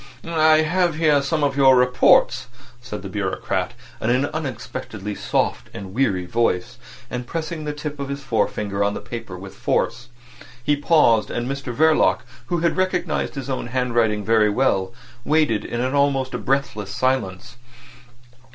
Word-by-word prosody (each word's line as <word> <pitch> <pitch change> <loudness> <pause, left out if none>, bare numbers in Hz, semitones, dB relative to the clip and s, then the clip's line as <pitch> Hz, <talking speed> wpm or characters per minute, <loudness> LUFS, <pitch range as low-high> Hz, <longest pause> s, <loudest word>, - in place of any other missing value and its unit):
"I 155 -1 +4
have 175 +1 +1
here 155 -3 +3
some 150 +2 -1
of 140 -1 +1
your 135 -2 +6
reports," 125 0 +4 0.3
said 105 -4 -7
the - - -5
bureaucrat 95 -1 -2 0.3
in 110 - 0
an 130 +3 +2
unexpectedly 130 -8 -5
soft - - -1
and 95 -1 -7
weary 100 -7 +1
voice, 115 +3 -1 0.3
and 125 -1 -4
pressing 160 +1 -4
the 150 - -2
tip 150 0 -6
of 140 -1 -4
his 140 0 -5
forefinger 105 -5 -1
on 100 0 0
the - - -4
papers 115 -6 -7
with 95 0 -9
force. 120 +1 -1 0.6
He 145 +3 +2
paused; 140 -8 +3
and 120 0 -3
Mr 135 -2 -4
Verloc, 155 +5 +3 0.3
who 175 -2 -1
had 170 +2 +1
recognised 180 -5 -1
his 135 -2 -5
own 130 -3 -3
handwriting 120 -4 0
very 110 -1 +4
well, 100 -4 +1 0.3
waited 150 -9 +2
in 120 - -3
an 130 +2 -1
almost 140 -2 +1
breathless 125 -7 -1
silence. 125 -2 -1
130 Hz, 155 wpm, -22 LUFS, 110-150 Hz, 0.6 s, your